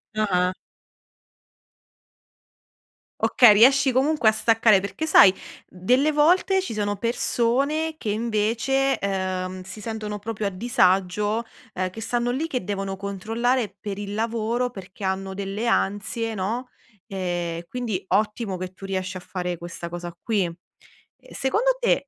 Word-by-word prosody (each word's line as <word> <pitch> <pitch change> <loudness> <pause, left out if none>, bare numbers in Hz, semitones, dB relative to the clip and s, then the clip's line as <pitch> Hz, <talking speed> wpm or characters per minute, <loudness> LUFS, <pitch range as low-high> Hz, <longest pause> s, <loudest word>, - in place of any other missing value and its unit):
Ah-ah. 185 -4 +1 2.7
Okay, 240 -5 +6
riesci 265 +5 +5
comunque 265 -1 +3
a - - +4
staccare. 225 -2 +4
Perché 260 +10 -4
sai, 195 -11 +7 0.4
delle 250 +12 +2
volte 360 +6 +3
ci 370 - -5
sono 205 -1 -1
persone 265 +8 0
che 215 - -4
invece, 230 +5 +1
uhm, 185 -1 -2
si 190 +3 -9
sentono 215 -1 -5
proprio 210 0 -3
a - - 0
disagio, 200 +1 +1 0.3
ehm, 185 0 -2
che 220 +5 -9
stanno 240 +2 -1
lì, 295 +6 -2
che 255 -9 -3
devono 195 0 -3
controllare 215 +3 -1
per 200 -1 -5
il 205 0 -5
lavoro 230 +2 -1
perché 195 -1 -11
hanno 190 0 -2
delle 200 +4 -3
ansie, 220 +2 0
no, 225 +6 -3 0.4
e 175 -4 -3
quindi 230 -7 -3
ottimo 210 -2 0
che 185 0 -6
tu 195 - -10
riesci 185 -1 -3
a - - -6
fare 180 -1 -4
questa 170 0 -7
cosa 175 0 -6
qui. 215 -5 +1 0.7
E - - -17
secondo 475 - +1
te 475 - +1
210 Hz, 135 wpm, -24 LUFS, 190-245 Hz, 2.7 s, sai